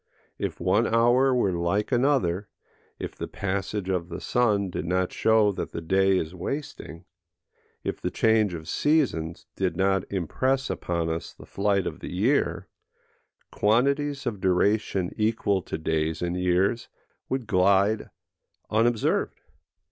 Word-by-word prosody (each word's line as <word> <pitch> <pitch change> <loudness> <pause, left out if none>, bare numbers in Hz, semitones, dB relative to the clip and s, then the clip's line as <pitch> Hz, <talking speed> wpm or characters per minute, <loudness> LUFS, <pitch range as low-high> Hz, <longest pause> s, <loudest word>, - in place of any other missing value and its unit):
If - - -3
one 95 +6 +2
hour 120 +4 +4
were 125 -6 +2
like 90 +7 -1
another; 120 -8 +1 0.5
if - - -6
the - - -5
passage 100 0 -3
of 90 -2 -1
the 85 - -5
sun 105 -6 +1
did - - -4
not 90 +1 0
show 110 -2 +3
that 95 - -5
the - - -3
day 95 +3 +2
is 80 -1 -3
wasting; 90 - -6 0.8
if - - -4
the - - -1
change 110 -4 +2
of 80 -1 -8
seasons 90 - 0
did 90 -3 -1
not 95 -1 +1
impress 130 +9 0
upon 85 -1 -2
us 80 0 -4
the - - -13
flight 100 -1 0
of - - -4
the - - -7
year; 115 +11 +1 0.8
quantities 140 +6 +1
of 105 -6 -3
duration 95 0 +1
equal 105 -3 +1
to 80 - -5
days 80 0 -1
and 90 0 -1
years 90 +5 +1 0.4
would 130 -2 -2
glide 100 +1 +2 0.6
unobserved. 115 +1 +1
100 Hz, 140 wpm, -26 LUFS, 90-115 Hz, 0.8 s, hour